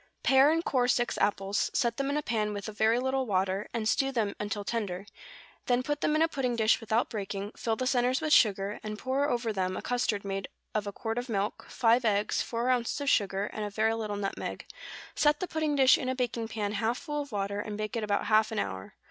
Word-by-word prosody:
= - - -45
Pare 270 +2 +6
and 330 +2 +1
core 250 -2 +2
six 240 -1 +1
apples; 200 0 +1
set 235 -1 +1
them 275 0 -1
in 285 - 0
a 300 - -1
pan 215 -4 -1
with 205 0 -5
a - - -4
very 220 +2 +2
little 265 +1 0
water, 190 0 0
and 225 -2 -2
stew 270 +3 +2
them 220 -6 -1
until 210 0 -3
tender; 200 -4 -3 0.6
then 245 0 +2
put 295 +2 -2
them 300 - +2
in 310 - +4
a - - +4
pudding 265 -6 -1
dish 220 -1 +3
without 225 +1 +1
breaking, 200 -1 -4
fill 225 -1 -1
the 255 - -2
centres 255 0 +2
with 310 -1 +1
sugar, 200 -4 +3
and 215 0 -5
pour 270 +5 0
over 235 -2 -1
them 185 -1 -1
a - - -4
custard 230 -5 -1
made 195 -1 -3 0.3
of 210 -1 -1
a - - -2
quart 225 +3 -3
of 245 +1 -6
milk, 205 -1 -2
five 240 0 +3
eggs, 210 -2 +1
four 235 +1 -2
ounces 245 +2 0
of 285 -1 +1
sugar, 195 -1 +1
and 215 - -4
a 210 - -2
very 220 +2 +1
little 215 -2 -3
nutmeg; 200 -1 -4 0.5
set 295 0 +3
the 365 - -2
pudding 315 -3 -1
dish 265 -2 +6
in 255 - -2
a 260 - -1
baking 240 -3 -2
pan 210 -2 -3
half 225 +3 0
full 295 -2 -3
of 285 - -8
water, 200 0 -2
and 210 0 -4
bake 215 +1 -4
it 230 - -1
about 205 -1 0
half 215 0 +3
an 220 - -4
hour. 95 - -4
225 Hz, 240 wpm, -29 LUFS, 205-255 Hz, 0.6 s, Pare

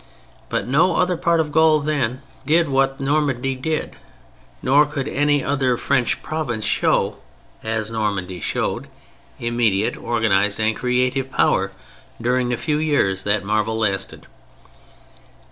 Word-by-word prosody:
But - - -2
no 160 +8 +3
other 180 0 +2
part 170 0 +1
of 155 -2 0
Gaul 160 0 +4
then 140 -3 -1 0.2
did 160 +4 +3
what 135 0 +1
Normandy 135 -2 0
did: 155 +4 -3 0.7
nor 140 +3 +5
could 145 -2 -4
any 145 0 +1
other 135 -3 +1
French 125 -2 0
province 135 -9 -3
show, - - +1 0.5
as 110 -1 -2
Normandy 100 -5 -2
showed, - - -2 0.5
immediate, 115 -4 +1
organized 105 -3 +1
and 110 0 +1
creative 125 +2 0
power, - - +1 0.5
during 125 +1 0
the 125 - -1
few 150 +2 -1
years 145 -12 +1
that 105 +1 +1
the - - -13
marvel 110 +2 0
lasted. 100 -3 -2
130 Hz, 130 wpm, -21 LUFS, 110-145 Hz, 0.7 s, nor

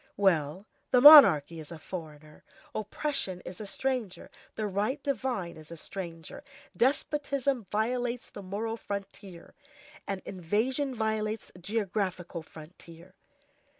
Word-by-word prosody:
Well, 180 -2 +1 0.2
the 250 - +5
monarchy 200 - +9
is 155 +1 -9
a 165 - -7
foreigner; 155 -3 -9 0.3
oppression 215 -3 -3
is 180 +3 -8
a 210 - -6
stranger; 250 -4 -3 0.2
the 215 - -2
right 205 +7 -1
divine 250 - -2
is 155 -1 -11
a 170 - -8
stranger. 165 - -8 0.3
Despotism 275 -2 0
violates 240 +3 -1
the 205 - -9
moral 215 +4 -4
frontier, 200 -4 -8 0.5
an 195 -1 -4
invasion 230 - -1
violates 220 -1 -2
the 180 - -15
geographical 185 -3 -2
frontier. 165 +3 -13
200 Hz, 115 wpm, -29 LUFS, 175-240 Hz, 0.5 s, monarchy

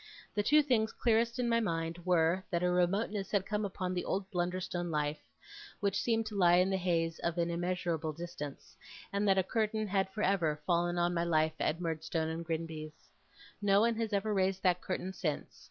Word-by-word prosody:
The 205 - +1
two 300 +8 +5
things 225 -6 +2
clearest 230 0 +1
in 250 -1 0
my 230 0 +3
mind 170 -4 -2
were, 175 +1 +2
that 170 -2 0
a 180 - +3
remoteness 195 +3 0
had 200 -2 +1
come 210 0 -1
upon 185 -2 -3
the 180 - -1
old 195 0 -2
Blunderstone 175 0 -2
life 150 -1 -1 0.6
which 200 -1 0
seemed 225 -1 +1
to 215 -1 -6
lie 175 -3 +5
in 180 +2 +3
the 190 - +2
haze 165 -3 0
of 170 0 -2
an 170 0 +1
immeasurable 170 -2 -1
distance; 155 -3 -8 0.4
and 200 +1 +1
that 195 -1 +4
a 190 - +4
curtain 215 +2 0
had 195 -1 +1
for 210 +2 -4
ever 165 -6 +1
fallen 175 0 +1
on 175 0 +2
my 170 -1 +1
life 160 -2 +2
at 165 - 0
Murdstone 160 -1 -2
and 165 +1 -4
Grinby's. 160 -2 -5 0.5
No 200 -1 +4
one 235 +1 +3
has 225 -1 -1
ever 210 +1 0
raised 190 -1 +1
that 180 -1 +3
curtain 185 0 -3
since. 165 -5 -3
180 Hz, 200 wpm, -32 LUFS, 170-200 Hz, 0.6 s, two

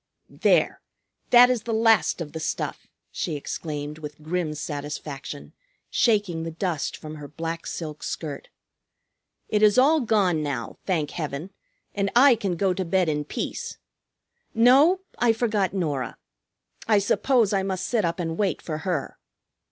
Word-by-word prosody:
"There! - - +3 0.5
That 245 +1 +8
is 245 -3 0
the 225 0 -2
last 225 -5 +3
of 150 -3 -5
the 160 - -6
stuff," - - -3 0.2
she 160 - -3
exclaimed 150 0 -5
with 150 0 -9
grim 160 -1 -2
satisfaction, 145 -1 -6 0.4
shaking 205 -8 +2
the 165 - -4
dust 165 -2 -2
from 155 0 -8
her 145 -1 -8
black 165 +3 -5
silk 155 -3 -6
skirt. 150 -4 -5 1.0
"It 210 - +1
is 210 +1 +5
all 295 +5 +5
gone 200 -8 +2
now, 140 -6 -4
thank 160 -6 0
Heaven, 155 +2 -5 0.4
and 200 -1 0
I 260 +2 +8
can 200 -6 -2
go 190 +1 +1
to 190 - -2
bed 180 0 +1
in 150 -1 -1
peace. - - -4 0.8
No, 275 +11 +6 0.2
I 240 -2 +4
forgot 215 -5 0
Norah. 150 -9 -2 0.7
I 215 -2 +5
suppose 215 +2 +2
I 195 - +2
must 190 -1 -2
sit 230 -4 +1
up 170 +1 -1
and 165 0 -3
wait 200 -3 +1
for 155 -2 -5
her. 170 -5 -3
180 Hz, 150 wpm, -25 LUFS, 155-215 Hz, 1.0 s, That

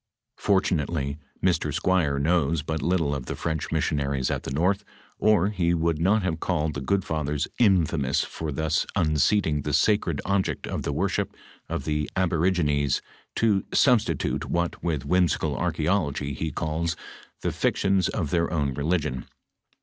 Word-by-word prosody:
Fortunately 80 -7 0 0.3
Mr. 80 -5 +2
Squier 85 -3 +1
knows 80 -1 +1
but 80 0 -3
little 85 -5 +1
of 65 -3 -5
the - - -3
French 80 -2 -3
missionaries 70 -4 0
at - - -1
the - - -6
north, 90 +8 +1 0.4
or 105 -3 +4
he 85 -4 +1
would 80 -1 0
not 100 +5 +3
liave 85 -3 -1
called 80 -4 -1
the 75 - -4
good 95 +8 0
fathers 75 -3 -1
infamous 85 - +3
for 80 -2 -5
thOB 80 +3 -2 0.2
unseating 80 -1 +2
the 75 +1 -3
sacred 85 -2 +2
object 100 0 0
of - - -3
the - - -2
worship - - -1 0.3
of - - -3
the 75 -1 -1
aborigines 80 -6 +1 0.3
to 105 -4 +2
substitute 125 -5 +2
what 85 0 -1
with 80 -6 -1
whimsical 85 -5 +1
nrcha'ology 80 -4 -1
lie 80 - 0
calls 80 +1 -2 0.5
thejietions 95 -1 +1
of 80 -8 -2
their 85 -1 +1
own 75 -5 0
religion. 75 -2 -1
80 Hz, 145 wpm, -26 LUFS, 75-90 Hz, 0.5 s, or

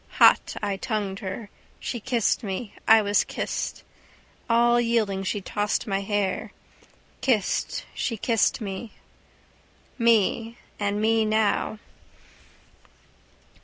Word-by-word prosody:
Hot - - +5
I 200 -1 -1
tongued 205 -4 -3
her. 195 +2 -6 0.3
She 240 - -4
kissed 235 0 +1
me. 200 0 -5
I 220 -1 +7
was 205 0 +3
kissed. - - -4 0.7
All 240 +1 +4
yielding 220 -5 +1
she 200 +1 -2
tossed 205 +2 -1
my 195 -2 -1
hair. 200 -1 -1 0.7
Kissed, 225 -7 0
she 230 - -2
kissed 225 +2 +1
me. 205 +2 -5 1.1
Me. 230 0 +2 0.2
And 205 0 0
me 220 +1 +3
now. 215 0 +1
215 Hz, 105 wpm, -25 LUFS, 200-230 Hz, 1.1 s, I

